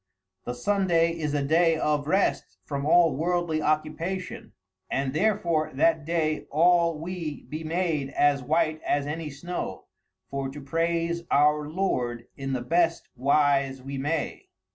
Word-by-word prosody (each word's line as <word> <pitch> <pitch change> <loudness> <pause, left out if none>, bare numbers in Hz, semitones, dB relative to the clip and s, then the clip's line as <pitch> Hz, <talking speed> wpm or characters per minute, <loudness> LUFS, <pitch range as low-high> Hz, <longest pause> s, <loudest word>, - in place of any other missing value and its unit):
The 120 - -3
Sundaie 170 +3 +2
is 150 -2 -1
a 145 - +1
daie 165 +3 +3
of 150 -2 0
rest 165 - 0
from 140 +4 -3
all 165 -3 +5
worldly 170 0 0
occupation, 155 +5 -2 0.4
and 135 0 -1
therefore 170 -4 +1
that 160 +1 +2
day 160 -2 -1
all 170 +1 +3
we 165 -2 -5
be 155 +2 -6
made 160 -4 -1
as 145 0 +2
white 155 +3 0
as 145 -1 0
any 150 +1 -4
snow, 175 +6 -5 0.5
for 135 -1 -2
to 140 +2 -8
praise 165 +3 -1
our 150 +1 +3
Lorde 125 -10 -1
in 135 -1 -4
the 125 - -1
best 170 +4 +1
wise 140 0 +2
we 135 0 -5
may. 150 +3 -2
155 Hz, 140 wpm, -26 LUFS, 140-170 Hz, 0.5 s, all